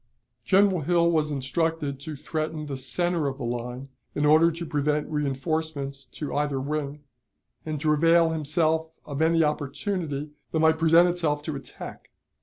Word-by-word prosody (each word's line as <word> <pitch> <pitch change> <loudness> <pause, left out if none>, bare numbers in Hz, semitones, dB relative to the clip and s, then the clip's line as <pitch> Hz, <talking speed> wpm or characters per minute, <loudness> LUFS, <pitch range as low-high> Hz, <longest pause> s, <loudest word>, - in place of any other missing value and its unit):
General 195 -1 +4
Hill 170 +2 +3
was 155 -2 +1
instructed 145 +1 -1
to 150 +2 -6
threaten 155 +1 -3
the 140 -2 -4
center 155 +5 -1
of 135 -1 -3
the 140 - -6
line, 120 +3 -4 0.3
in 145 - +1
order 155 +3 +6
to 170 +1 -6
prevent 150 0 0
reënforcements 145 -1 -2
to 150 - -5
either 145 -2 0
wing, 145 +1 -3 0.6
and 155 -1 -2
to 155 -1 +3
avail 165 +2 +4
himself 160 +1 +1 0.2
of 145 0 -4
any 165 0 +4
opportunity 150 0 -2 0.2
that 160 - 0
might 160 0 +4
present 165 +2 +6
itself 160 -4 0
to 155 -1 -4
attack. 135 - -9
155 Hz, 155 wpm, -26 LUFS, 140-165 Hz, 0.6 s, order